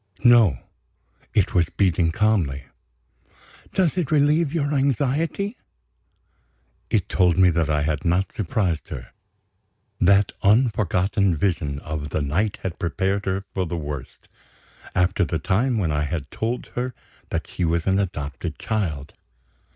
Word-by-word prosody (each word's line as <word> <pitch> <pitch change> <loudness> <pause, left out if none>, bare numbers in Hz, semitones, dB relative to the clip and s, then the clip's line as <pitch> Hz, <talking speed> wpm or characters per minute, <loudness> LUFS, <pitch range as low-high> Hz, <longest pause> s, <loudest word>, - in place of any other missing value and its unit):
No! 115 - +6 0.8
It 100 - +2
was 85 -2 +2
beating 85 -4 +1
calmly. 85 -9 +1 1.1
"Does 185 -2 +1
it 165 - -1
relieve 150 +1 +3
your 150 -3 0
anxiety?" 145 - 0 1.3
It - - +1
told 90 -2 +2
me 90 -1 +6
that 80 -2 0
I 75 -1 +1
had 75 0 -1
not 90 +3 +1
surprised 90 -4 -1
her. 60 -2 -7 0.9
That 100 +2 +4
unforgotten 100 -4 +2
Vision 75 -5 -1
of 75 -1 -5
the 75 - -1
night 95 +9 0
had 90 -3 -4
prepared 95 +3 -1
her 95 +1 -1
for 95 -2 -1
the 85 - -3
worst, 75 -4 -7 0.7
after 95 +2 +2
the 85 -1 -1
time 110 - +1
when 90 -7 0
I 75 0 0
had 75 -2 -4
told 115 +3 -3
her 125 -1 -3 0.3
that - - -2
she 90 - -4
was 85 0 +1
an 95 0 +2
adopted 80 -3 -4
child. 80 -11 -3
95 Hz, 135 wpm, -23 LUFS, 80-110 Hz, 1.3 s, No